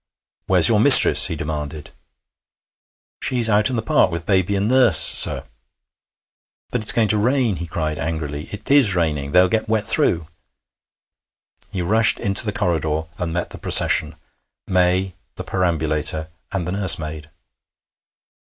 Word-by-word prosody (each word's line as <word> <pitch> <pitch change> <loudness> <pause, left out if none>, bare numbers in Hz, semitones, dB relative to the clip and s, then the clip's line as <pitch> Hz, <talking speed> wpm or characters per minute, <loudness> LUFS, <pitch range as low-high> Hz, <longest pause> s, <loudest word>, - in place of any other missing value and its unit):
'Where's - - +6
your - - +2
mistress?' - - +7
he - - -6
demanded. 75 0 -8 1.3
'She's 120 -3 -1
out 105 +2 +1
in 130 - -5
the 110 - -5
park 110 - 0
with 85 -1 -8
baby 95 0 -1
and 100 +1 -3
nurse, 130 0 +2
sir.' - - +4 1.3
'But 125 - -4
it's 110 - +5
going 115 -2 -1
to 105 +1 -1
rain,' 120 -3 -2
he 85 - -8
cried 80 -2 -6
angrily. 75 -2 -7
'It 105 +5 -8
is 130 -10 +2
raining. 75 -5 -4
They'll 90 +4 +2
get 110 +2 -4
wet 110 -2 -2
through.' 85 -6 0 1.5
He 95 -3 -6
rushed 110 +5 +3
into 100 +2 -2
the - - -2
corridor, 80 -4 -4 0.2
and 85 -2 -5
met 85 0 -6
the - - -12
procession 75 0 +2 0.5
May, 90 +1 -2 0.2
the - - -8
perambulator, 80 -3 -2 0.2
and 95 -4 -5
the - - -5
nursemaid. 80 -5 +1
90 Hz, 145 wpm, -18 LUFS, 80-105 Hz, 1.5 s, mistress